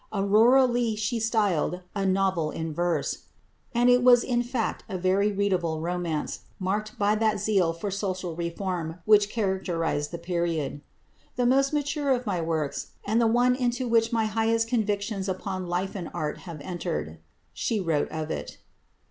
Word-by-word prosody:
"Aurora 220 Hz, +6 st, +5 dB
Leigh" 240 Hz, -3 st, 0 dB
she 215 Hz, +2 st, -1 dB
styled 205 Hz, -6 st, +1 dB
a 195 Hz, -1 st, 0 dB
"novel 190 Hz, -4 st, +1 dB
in 160 Hz, 0 st, -4 dB
verse," 175 Hz, +2 st, -1 dB, 0.5 s
and 240 Hz, +1 st, +2 dB
it 245 Hz, 0 st, +6 dB
was 245 Hz, -1 st, +6 dB
in 240 Hz, -1 st, +1 dB
fact 240 Hz, -2 st, -2 dB
a 185 Hz, -, -3 dB
very 190 Hz, +3 st, +2 dB
readable 185 Hz, -5 st, 0 dB
romance, 170 Hz, -2 st, -2 dB, 0.2 s
marked 210 Hz, +3 st, -2 dB
by 205 Hz, 0 st, +2 dB
that 215 Hz, 0 st, +1 dB
zest 180 Hz, -6 st, +1 dB
for 200 Hz, +3 st, -3 dB
social 185 Hz, -3 st, -3 dB
reform 170 Hz, -1 st, -3 dB
which 210 Hz, -1 st, +5 dB
characterised 185 Hz, -8 st, -1 dB
the 170 Hz, -, -5 dB
period. 170 Hz, -4 st, -2 dB, 0.5 s
"The 245 Hz, -, +1 dB
most 270 Hz, +2 st, +3 dB
mature 290 Hz, -1 st, -1 dB
of 250 Hz, -2 st, +1 dB
my 185 Hz, -5 st, -1 dB
works, 160 Hz, -3 st, -2 dB
and 220 Hz, +3 st, +2 dB
the 230 Hz, -, +4 dB
one 245 Hz, +2 st, +4 dB
into 245 Hz, 0 st, -1 dB
which 230 Hz, -1 st, +3 dB
my 225 Hz, -2 st, +1 dB
highest 225 Hz, +1 st, +1 dB
convictions 205 Hz, -3 st, -1 dB
upon 185 Hz, 0 st, -3 dB
Life 180 Hz, +2 st, -2 dB
and 180 Hz, -4 st, -5 dB
Art 155 Hz, -3 st, -3 dB
have 155 Hz, -3 st, -7 dB
entered," 80 Hz, -, -4 dB, 0.3 s
she 225 Hz, -3 st, -1 dB
wrote 165 Hz, -6 st, 0 dB
of 155 Hz, 0 st, -4 dB
it. -, -, -5 dB
195 Hz, 165 wpm, -26 LUFS, 170-225 Hz, 0.5 s, it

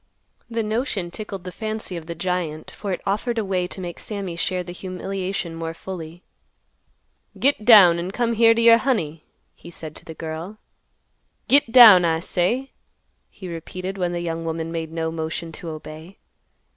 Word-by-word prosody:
The 230 Hz, -1 st, -1 dB
notion 215 Hz, -5 st, -2 dB
tickled 200 Hz, -2 st, -7 dB
the 180 Hz, -, -6 dB
fancy 215 Hz, -2 st, -5 dB
of 165 Hz, -2 st, -7 dB
the 170 Hz, -, -5 dB
giant, 170 Hz, -3 st, -3 dB
for 200 Hz, -, -5 dB
it 180 Hz, -, -3 dB
offered 215 Hz, +4 st, -1 dB
a 220 Hz, -, 0 dB
way 185 Hz, -2 st, -1 dB
to 190 Hz, -, -8 dB
make 175 Hz, -2 st, -6 dB
Sammy 200 Hz, -5 st, -5 dB
share 180 Hz, +2 st, -1 dB
the 175 Hz, -, -8 dB
humiliation 185 Hz, -1 st, -4 dB
more 165 Hz, 0 st, -5 dB
fully. 170 Hz, -1 st, -8 dB, 1.1 s
"Git 275 Hz, -5 st, +2 dB
down 190 Hz, -8 st, +8 dB
an' 175 Hz, +2 st, -3 dB
come 235 Hz, +3 st, 0 dB
here 230 Hz, 0 st, +5 dB
t' 230 Hz, -, +1 dB
yer 230 Hz, 0 st, +8 dB
honey," 165 Hz, -, -1 dB, 0.3 s
he -, -, -13 dB
said 160 Hz, -2 st, -9 dB
to -, -, -13 dB
the 160 Hz, -, -9 dB
girl. 160 Hz, +6 st, -6 dB, 0.9 s
"Git 275 Hz, -4 st, +4 dB
down, 225 Hz, -7 st, +10 dB
I 165 Hz, -1 st, +2 dB
say," 190 Hz, +10 st, -1 dB, 0.6 s
he 185 Hz, -, -10 dB
repeated, 185 Hz, +3 st, -6 dB
when 175 Hz, -1 st, 0 dB
the 175 Hz, 0 st, -3 dB
young 165 Hz, -1 st, -3 dB
woman 165 Hz, 0 st, -3 dB
made 165 Hz, -1 st, -4 dB
no 160 Hz, 0 st, -2 dB
motion 160 Hz, +1 st, -4 dB
to 165 Hz, +1 st, -8 dB
obey. 155 Hz, +4 st, -9 dB
180 Hz, 175 wpm, -23 LUFS, 165-210 Hz, 1.1 s, down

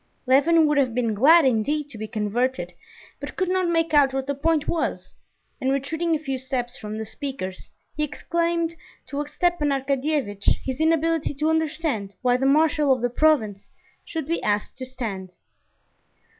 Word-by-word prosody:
Levin 310 Hz, +5 st, +5 dB
would 300 Hz, -1 st, +2 dB
have 255 Hz, -4 st, +1 dB
been 235 Hz, -3 st, +1 dB
glad 300 Hz, +9 st, +6 dB
indeed 270 Hz, +5 st, +1 dB
to 280 Hz, -, -13 dB
be 220 Hz, 0 st, -5 dB
converted, 235 Hz, +5 st, -1 dB, 0.5 s
but -, -, -7 dB
could 370 Hz, -2 st, -1 dB
not 370 Hz, -1 st, +1 dB
make 330 Hz, -1 st, +1 dB
out 280 Hz, -3 st, +5 dB
what 270 Hz, 0 st, -1 dB
the 280 Hz, -, -1 dB
point 310 Hz, +2 st, 0 dB
was, 335 Hz, -, -2 dB, 0.5 s
and 265 Hz, -, +1 dB
retreating 320 Hz, +5 st, 0 dB
a -, -, +1 dB
few 270 Hz, -4 st, -4 dB
steps 255 Hz, -1 st, -3 dB
from 215 Hz, -3 st, -6 dB
the 220 Hz, -, -4 dB
speakers, 220 Hz, -6 st, -6 dB, 0.3 s
he 300 Hz, -, -3 dB
explained 335 Hz, +2 st, -1 dB, 0.3 s
to 285 Hz, +1 st, -3 dB
Stepan 345 Hz, -2 st, 0 dB
Arkadyevitch 275 Hz, -6 st, -1 dB, 0.2 s
his 260 Hz, +1 st, -4 dB
inability 320 Hz, -1 st, +1 dB
to 305 Hz, +3 st, +1 dB
understand 305 Hz, -10 st, -1 dB
why 245 Hz, -1 st, +3 dB
the 265 Hz, +2 st, +1 dB
marshal 300 Hz, 0 st, +3 dB
of 255 Hz, -2 st, +2 dB
the 245 Hz, -, +1 dB
province 245 Hz, -9 st, +1 dB, 0.3 s
should 320 Hz, -3 st, -5 dB
be 335 Hz, +3 st, -1 dB
asked 205 Hz, 0 st, -1 dB
to 255 Hz, -, -5 dB
stand. 205 Hz, -8 st, -6 dB
280 Hz, 170 wpm, -24 LUFS, 245-315 Hz, 0.5 s, glad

